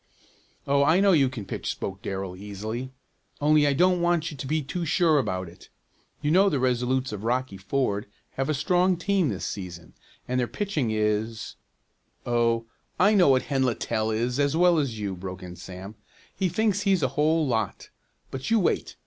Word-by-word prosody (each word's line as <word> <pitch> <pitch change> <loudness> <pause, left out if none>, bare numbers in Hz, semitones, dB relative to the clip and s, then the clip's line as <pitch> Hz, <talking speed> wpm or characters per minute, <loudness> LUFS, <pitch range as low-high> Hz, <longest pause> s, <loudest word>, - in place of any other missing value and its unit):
"Oh, 140 0 +3
I 160 +5 +4
know 200 0 +5
you 140 -7 +4
can 120 -6 -7
pitch," - - -4
spoke 95 0 -4
Darrell 95 -4 -4
easily, 110 +6 -6 0.5
"only 150 0 +4
I 140 - +3
don't 180 +4 +3
want 175 -2 +1
you 145 - -9
to 135 - -6
be 155 +2 0
too 170 +6 -4
sure 160 -1 +3
about 95 -7 -2
it. 85 - -15 0.5
You 150 - +1
know 195 +4 +5
the 150 - 0
Resolutes 130 0 0
of 105 -1 -6
Rocky 125 -3 -1
Ford 105 0 -1 0.2
have 135 +2 -3
a 155 - +1
strong 180 +4 +2
team 190 -3 +1
this 100 -5 -3
season, 85 -4 -7 0.3
and 125 0 0
their 120 - +1
pitcher 185 - -2
is 110 +1 -1 0.4
" - - -43
"Oh, 115 -1 +1 0.3
I 200 +4 +5
know 190 -6 +5
what 130 -1 +4
Hen 135 -2 -1
Littell 110 -3 -1
is 120 +4 -1
as 145 +2 +2
well 175 -1 +5
as 130 -6 -2
you," 100 -3 -3
broke 90 0 -7
in 90 -1 -8
Sam. 95 +3 -9 0.4
"He 185 -1 0
thinks 205 +2 +1
he's 195 -5 +2
a - - +2
whole 155 +2 +2
lot, 110 -6 -2 0.4
but 130 0 -5
you 230 - +4
wait. 180 - 0
130 Hz, 190 wpm, -26 LUFS, 110-160 Hz, 0.5 s, know